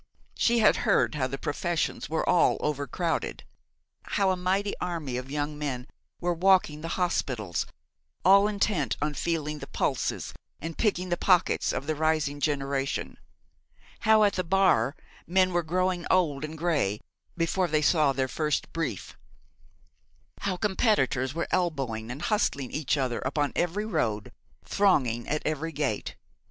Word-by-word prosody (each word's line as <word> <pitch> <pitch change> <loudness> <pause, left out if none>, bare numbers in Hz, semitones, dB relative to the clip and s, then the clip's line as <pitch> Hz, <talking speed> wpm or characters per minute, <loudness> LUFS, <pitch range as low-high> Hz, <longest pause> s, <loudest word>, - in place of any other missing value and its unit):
She 235 0 +2
had 215 -2 +5
heard 210 -7 +2
how 135 -4 0
the 135 +1 -5
professions 170 +4 -2
were 160 0 -1
all 180 - +4
over 145 -1 -1
crowded: 165 +5 -2 0.6
how 195 -2 +1
a - - +1
mighty 190 +3 0
army 165 -8 -3
of 125 +1 -5
young 150 +1 -3
men 130 -4 -3 0.3
were 175 0 0
walking 175 -4 +3
the 165 - -4
hospitals, 125 - -1 0.6
all 200 +2 +7
intent 200 -8 0
on 150 +1 -1
feeling 150 0 -2
the - - -8
pulses - - -2 0.3
and 165 0 -5
picking 185 -5 0
the 175 - 0
pockets 180 -1 +3
of - - -3
the 155 - 0
rising 155 -2 0
generation: 140 -2 -1 0.8
how 220 -1 +5
at 205 - +3
the 185 - -1
Bar 170 -8 +3 0.3
men 185 +1 +3
were 175 - +2
growing 180 +1 -1
old 155 -7 +2
and 155 +1 -5
grey 150 - 0 0.4
before 175 +2 +1
they 155 -1 +1
saw 150 -2 +4
their 130 -1 0
first 150 +2 -2
brief: 160 - -3 1.2
how 190 -2 -2
competitors 175 - +1
were 170 - -1
elbowing 135 -11 -1
and 130 +4 -6
hustling 140 - 0
each 150 -1 0
other 130 -4 -1
upon 145 +2 -1
every 180 +5 0
road, 110 - -1 0.3
thronging 130 - +2
at 155 +1 -2
every 155 +1 -2
gate. 140 -8 -2
155 Hz, 150 wpm, -27 LUFS, 140-185 Hz, 1.2 s, all